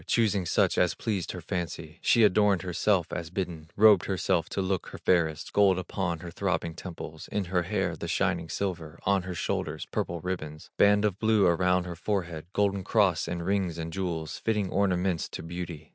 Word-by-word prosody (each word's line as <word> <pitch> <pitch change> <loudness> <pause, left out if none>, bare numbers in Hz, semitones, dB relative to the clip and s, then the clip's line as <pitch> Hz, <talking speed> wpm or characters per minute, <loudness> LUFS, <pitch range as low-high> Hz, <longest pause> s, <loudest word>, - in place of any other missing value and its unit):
Choosing 105 -6 +2
such - - +2
as 90 -3 +2
pleased 100 -6 -2
her 90 - -6
fancy, 85 -2 -5
She 115 - +4
adorned 100 -2 +4
herself 90 0 +1
as 85 -2 -4
bidden, 85 -4 -4
Robed 105 -3 +6
herself 95 -3 0
to - - -3
look 95 -1 -1
her - - -8
fairest, 80 -4 +1
Gold 100 -2 +5
upon 90 -2 -3
her 85 - -7
throbbing 90 -2 -1
temples, 80 -3 -8
In 105 -2 -2
her 90 0 +1
hair 95 -1 -1
the - - -6
shining 80 - 0
silver, 85 -5 -3
On 100 0 +2
her 90 0 -6
shoulders - - -2
purple 85 0 -3
ribbons, 80 -3 -5
Band 105 +1 +4
of 100 -2 -1
blue 110 -3 +3
around 90 +1 +3
her 90 -1 -6
forehead, 85 -4 -3
Golden 100 -1 +1
cross, 95 -4 +2
and 85 0 -3
rings, 95 -3 0
and 80 0 -5
jewels, 85 -5 -3
Fitting 105 -4 0
ornaments 95 -4 +1
to - - -7
beauty. 80 -2 -6
90 Hz, 185 wpm, -28 LUFS, 85-100 Hz, -, Robed